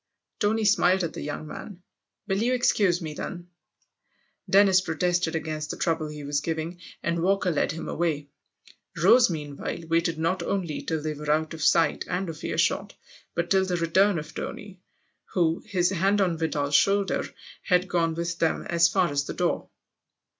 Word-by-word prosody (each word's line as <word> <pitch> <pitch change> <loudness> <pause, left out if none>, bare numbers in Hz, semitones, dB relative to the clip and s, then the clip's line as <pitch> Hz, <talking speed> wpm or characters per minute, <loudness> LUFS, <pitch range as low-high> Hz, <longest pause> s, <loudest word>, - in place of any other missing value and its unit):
Tony 220 +1 +1
smiled 190 -3 +4
at 170 - -3
the - - -6
young 150 +1 -5
man. 180 +4 -9 0.4
"Will 195 +2 0
you 245 +3 +2
excuse 195 -7 +2
me 155 -1 -5
then? 175 +2 -7 0.5
" - - -30
Dennis 195 -1 +6
protested 175 0 0
against 155 -1 -3
the - - -4
trouble 160 -2 0
he 150 -1 -8
was 145 0 -1
giving, 165 +2 -4 0.2
and 170 0 0
Walker 190 0 +2
led 150 - 0
him 160 - -6
away. 155 -4 -1 0.7
Rose 240 -3 +6
meanwhile 150 -4 -4
waited 165 0 +1
not 165 +3 0
only 170 -3 -2
till 160 -2 -3
they 155 -1 -2
were 150 0 -7
out 155 +2 +1
of 160 - -8
sight 165 -1 +3
and 180 0 -2
of 160 -1 -8
earshot, - - 0 0.4
but 170 0 -2
till 190 -1 +4
the 180 -2 -1
return 180 +4 +3
of 155 - -6
Tony, 200 -3 -7 0.5
who, 165 -3 +1
his 185 -3 +1
hand 195 +3 +2
on 180 -4 +2
Vidal's 150 -3 -2
shoulder, 195 +6 +3 0.4
had 180 -1 +2
gone 165 -2 0
with 170 0 -3
them 165 - +1
as 170 0 +3
far 180 0 +1
as 140 0 0
the - - -6
door. - - -1
170 Hz, 175 wpm, -26 LUFS, 160-190 Hz, 0.7 s, Dennis